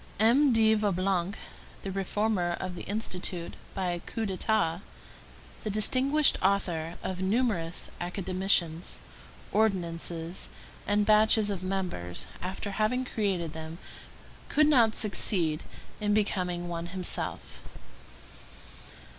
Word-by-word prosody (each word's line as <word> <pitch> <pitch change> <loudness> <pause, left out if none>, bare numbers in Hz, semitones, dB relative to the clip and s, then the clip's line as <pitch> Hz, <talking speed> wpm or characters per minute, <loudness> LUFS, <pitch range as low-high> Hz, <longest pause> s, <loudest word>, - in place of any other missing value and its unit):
M. 255 +6 +5
de 220 -1 +5
Vaublanc, 195 -2 0 0.5
the 195 - -3
reformer 195 -2 0
of 185 -1 -4
the 175 - -7
Institute 180 -5 -1 0.2
by 185 -3 0
a 175 - -2
coup 225 +5 -4
d'état, 185 -3 0 0.8
the 215 - -2
distinguished 265 +8 +3
author 175 -4 0
of 185 -1 -3
numerous 190 -5 0
academicians, 180 -2 0 0.5
ordinances, 170 -4 -1 0.4
and 205 0 +3
batches 215 0 +5
of 190 -3 -3
members, 185 - -3 0.2
after 190 +2 -4
having 220 +5 +1
created 190 -9 -1
them, 160 0 -7 0.7
could 305 - +4
not 240 -7 +5
succeed 175 -6 +1 0.4
in 210 -1 +1
becoming 180 -4 0
one 170 0 -4
himself. 180 - -3
190 Hz, 105 wpm, -29 LUFS, 175-215 Hz, 0.8 s, M